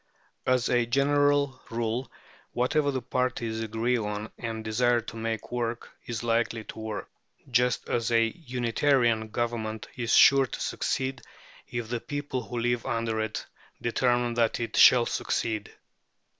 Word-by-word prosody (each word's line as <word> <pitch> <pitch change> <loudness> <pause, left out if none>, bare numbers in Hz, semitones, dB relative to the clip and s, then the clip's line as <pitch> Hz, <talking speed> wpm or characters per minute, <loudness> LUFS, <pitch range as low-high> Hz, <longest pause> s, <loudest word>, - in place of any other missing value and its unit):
As 125 -1 +3
a 120 -1 +2
general 140 +1 +2
rule, 115 +2 -2 0.4
whatever 145 +4 +1
the 130 -3 -2
parties 120 -3 -1
agree 115 +3 0
on 105 0 -4
and 115 -1 -4
desire 120 +2 +2
to 115 - -9
make 115 -1 -4
work 120 -1 -3 0.2
is 120 -1 -4
likely 115 -1 0
to 110 - -9
work, 110 -1 -5 0.4
just 125 0 +2
as 115 0 0
a 115 -1 +4
Unitarian 120 -4 +1
government 110 -1 -3
is 120 -2 -2
sure 135 -1 +7
to - - -6
succeed 130 -1 -2 0.5
if 120 -2 -4
the 120 +1 -2
people 145 -3 -3
who 120 +1 -6
live 120 0 0
under 115 -1 -1
it 110 0 -3 0.3
determine 120 0 +1
that 115 -1 +1
it 115 - -3
shall 120 -2 +7
succeed. 110 -3 -2
120 Hz, 145 wpm, -27 LUFS, 115-125 Hz, 0.5 s, sure